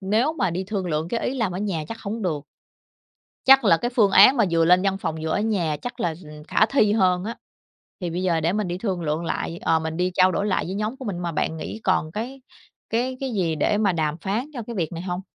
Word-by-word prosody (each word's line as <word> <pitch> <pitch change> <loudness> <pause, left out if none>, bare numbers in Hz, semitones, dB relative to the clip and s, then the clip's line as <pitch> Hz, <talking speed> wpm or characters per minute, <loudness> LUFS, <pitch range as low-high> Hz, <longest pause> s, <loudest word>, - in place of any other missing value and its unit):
nếu 220 +10 +1
mà 285 - 0
đi 185 +3 -3
thương 195 -2 -3
lượng 160 0 -1
cái 230 - -1
ý 260 - -2
làm 220 -8 -1
ở 180 - -4
nhà 185 -7 -2
chắc 225 - -6
hổng 215 +2 -4
được. 155 -6 -1 1.1
Chắc 270 -1 +7
là 165 -4 +6
cái 240 +1 -2
phương 205 -5 +4
án 245 +8 +7
mà 225 - +4
vừa 165 -1 +3
lên 180 +2 +5
văn 195 -1 0
phòng 160 -4 -3
vừa 160 - -2
ở 205 - +1
nhà 180 -9 0
chắc 245 0 -6
là, 170 -6 0
ừm, 150 0 -11
khả 215 - +3
thi 215 -5 +2
hơn 185 -3 +2
á, 230 +2 -4 0.7
thì 175 - -2
bây 180 +3 -3
giờ 170 -3 +2
để 170 +4 +1
mình 210 -3 -1
đi 175 +1 -3
thương 185 -4 -2
lượng 155 +2 -2
lại, 165 0 -3
ờ, 160 0 +2
mình 160 +1 -4
đi 180 +1 0
trao 185 0 +5
đổi 200 +4 -1
lại 195 - 0
với 185 - -4
nhóm 215 +5 -3
của 260 - -8
mình. 185 -4 -3
Mà 170 -1 -3
bạn 160 +1 -1
nghĩ 220 - -6
còn 160 -4 +1
cái 255 +6 -5 0.5
cái 255 +3 -1
cái 265 -3 -3
gì 170 -5 0
để 205 +7 +1
mà 200 -4 +2
đàm 155 -1 -1
phán 215 +7 -1
cho 240 - -5
cái 235 - -6
việc 170 -5 -2
này 165 - -5
hông? 180 0 -3
190 Hz, 270 wpm, -23 LUFS, 170-220 Hz, 1.1 s, Chắc